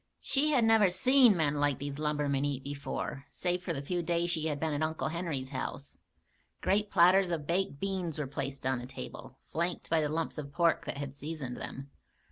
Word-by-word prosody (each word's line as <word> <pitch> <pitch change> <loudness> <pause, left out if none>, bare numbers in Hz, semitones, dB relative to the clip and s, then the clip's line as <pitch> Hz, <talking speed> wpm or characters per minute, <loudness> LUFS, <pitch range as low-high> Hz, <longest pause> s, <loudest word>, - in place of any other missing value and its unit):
She 285 +3 +2
had 270 -6 +3
never 220 -3 +5
seen 240 +3 +5
men 150 -3 +2
like 145 -2 +2
these 140 0 -5
lumbermen 150 -2 0
eat 140 -2 -2
before, 140 -1 -4
save 180 0 -1
for 180 - -3
the 140 -4 -3
few 175 +4 -1
days 170 +1 0
she 160 -2 -1
had 150 -2 -2
been 160 0 -1
at 145 - -2
Uncle 155 0 -1
Henry's 160 -6 -2
house. 140 +1 -6 0.6
Great 205 +1 +2
platters 185 +2 +5
of 165 -4 -2
baked 170 -3 0
beans 185 -4 -2
were 150 - -2
placed 135 0 -5
on 130 -1 +1
the 125 - -7
table, 135 - -9
flanked 170 +1 -1
by 165 -1 +4
the 150 - 0
lumps 160 0 -2
of 140 -2 -7
pork 170 +1 +2
that - - -4
had 140 -1 -5
seasoned 145 -3 -5
them. 135 +1 -7
155 Hz, 205 wpm, -31 LUFS, 140-175 Hz, 0.6 s, never